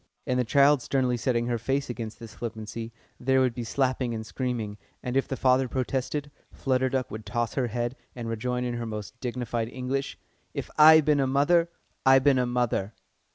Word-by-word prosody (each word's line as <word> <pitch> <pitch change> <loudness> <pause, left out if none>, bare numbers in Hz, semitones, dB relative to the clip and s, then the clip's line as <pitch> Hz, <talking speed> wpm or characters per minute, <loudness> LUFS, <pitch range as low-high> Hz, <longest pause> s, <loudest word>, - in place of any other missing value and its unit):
_" - - -40 0.2
And 125 0 0
the - - +3
child 140 +3 +4
sternly 130 -2 +1
setting 120 -1 0
her 120 -1 -1
face 135 +4 -1
against 115 -3 -6
this 115 -2 -10
flippancy, 115 0 -6 0.3
there 130 +1 +2
would 130 -2 +2
be 120 - -4
slapping 125 0 0
and 110 0 -5
screaming, 115 -4 -3 0.2
and 125 0 -3
if 135 - +2
the 135 - -3
father 130 0 +3
protested, 135 +3 -2 0.2
Flutter 130 -1 0
Duck 130 -1 -2
would 110 +1 -6
toss 120 0 -2
her 130 -3 0
head, 120 +2 -2 0.2
and 120 -2 -5
rejoin 125 +2 -2
in 120 -1 -2
her 120 -1 -4
most 110 +3 -7
dignified 120 -2 -3
English: 130 +2 -3 0.4
"If - - -4
I 155 +1 +9
bin 150 -1 +2
a 135 - +2
mother, 165 +6 +3 0.3
I 135 0 +7
bin 135 0 +4
a 125 - +1
mother!" 120 -4 -1
125 Hz, 200 wpm, -27 LUFS, 115-135 Hz, 0.4 s, I